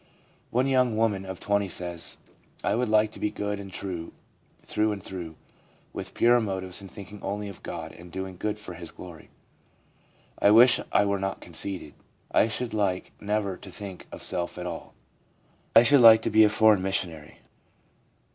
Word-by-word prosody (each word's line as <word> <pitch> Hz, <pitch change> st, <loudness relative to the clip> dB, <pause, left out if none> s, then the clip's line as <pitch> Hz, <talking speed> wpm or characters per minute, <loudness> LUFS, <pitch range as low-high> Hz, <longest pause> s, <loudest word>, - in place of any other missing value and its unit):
One 125 Hz, +2 st, +1 dB
young 130 Hz, -4 st, +2 dB
woman 105 Hz, -4 st, +1 dB
of 95 Hz, -1 st, -6 dB
20 100 Hz, -1 st, 0 dB
says: 85 Hz, -1 st, -4 dB, 0.2 s
' -, -, -23 dB
I -, -, +1 dB
would 120 Hz, 0 st, 0 dB
like 110 Hz, 0 st, +3 dB
to -, -, -11 dB
be 105 Hz, -, 0 dB
good 105 Hz, -1 st, -3 dB
and 100 Hz, -1 st, -9 dB
true 90 Hz, -3 st, -5 dB, 0.4 s
through 105 Hz, 0 st, 0 dB
and 100 Hz, -3 st, -8 dB
through; 85 Hz, -4 st, -6 dB, 0.6 s
with -, -, -7 dB
purer 120 Hz, +1 st, +5 dB
motives, 95 Hz, -3 st, -3 dB
and 95 Hz, -, -10 dB
thinking 100 Hz, +1 st, -11 dB
only 100 Hz, +1 st, -3 dB
of 100 Hz, -, -11 dB
God 80 Hz, -2 st, -6 dB
and 85 Hz, +1 st, -13 dB
doing 95 Hz, +1 st, -5 dB
good 105 Hz, +4 st, -3 dB
for 95 Hz, -4 st, -8 dB
His 85 Hz, -1 st, -8 dB
glory. 85 Hz, -3 st, -12 dB, 1.1 s
I -, -, +5 dB
wish 120 Hz, +4 st, +7 dB
I 100 Hz, -, +4 dB
were 100 Hz, -1 st, 0 dB
not 95 Hz, 0 st, -3 dB
conceited. 85 Hz, -2 st, -4 dB, 0.4 s
I -, -, +4 dB
should 115 Hz, +2 st, -3 dB
like 100 Hz, -4 st, -1 dB
never 105 Hz, -2 st, -1 dB
to 95 Hz, -, -12 dB
think 95 Hz, 0 st, -8 dB
of -, -, -8 dB
self 85 Hz, 0 st, -1 dB
at 90 Hz, -, -5 dB
all. 85 Hz, -2 st, -7 dB, 0.8 s
I 115 Hz, -, +9 dB
should 135 Hz, +2 st, +5 dB
like 110 Hz, -1 st, +9 dB
to -, -, -1 dB
be 110 Hz, -, +7 dB
a 105 Hz, -, +6 dB
foreign 110 Hz, -2 st, +4 dB
missionary.' 85 Hz, -5 st, -3 dB
100 Hz, 185 wpm, -27 LUFS, 90-110 Hz, 1.1 s, I